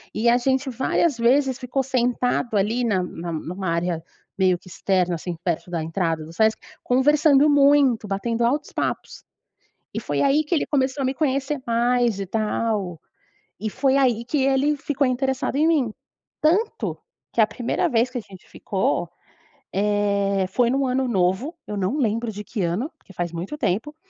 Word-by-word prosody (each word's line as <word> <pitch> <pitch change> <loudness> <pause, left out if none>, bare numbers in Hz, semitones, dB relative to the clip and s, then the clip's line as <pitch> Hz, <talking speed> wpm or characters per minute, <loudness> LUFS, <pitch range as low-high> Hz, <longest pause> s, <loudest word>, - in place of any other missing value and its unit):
E 225 +2 +1
a 240 - +5
gente 265 +2 0
várias 265 +5 +1
vezes 260 +3 +2
ficou 265 +1 -1
sentado 245 -3 0
ali, 225 +5 +1
na 200 -6 +1
na 170 -1 -6
numa 180 +4 -4
área 170 0 -1 0.3
meio 185 -2 +3
que 185 - -20
externa 185 -1 0
assim 170 +1 -5
perto 175 0 -2
da 165 -2 -2
entrada 165 -1 -1
do 165 - -11
Sesc, 220 +3 +2 0.3
conversando 285 +3 +4
muito, 280 -6 +4
batendo 230 +4 -1
altos 285 +5 0
papos. - - -3 0.7
E - - -2
foi - - -2
aí 285 +2 +3
que 335 - 0
ele - - +1
começou 270 -1 0
a 265 - +1
me 260 - 0
conhecer 275 -1 -1
mais 240 -2 +2
e 195 - -2
tal. 210 -3 -1 0.6
E 215 0 -2
foi 270 +2 +1
aí 240 -4 +2
que 275 +2 0
ele 275 +2 +2
ficou 280 -1 0
interessado 265 +1 -1
em 310 +2 +3
mim. 270 -9 +2 0.5
Tanto 360 +9 +1 0.3
que - - +1
a 215 - +6
primeira 245 - -1
vez 240 -2 +2
que 250 - -4
a - - -3
gente 190 -3 -15
ficou, - - -1 0.7
eh, 200 -1 +1
foi 240 +3 +2
num 270 0 +1
ano 255 0 0
novo, 190 - 0
eu 210 - -4
não 200 +9 -1
lembro 230 -1 0
de 210 0 -7
que 210 -4 -3
ano, 180 - -1
porque 195 - -18
faz 175 -1 -3
muito 175 - -5
tempo. 240 +12 -1
235 Hz, 175 wpm, -23 LUFS, 195-270 Hz, 0.7 s, a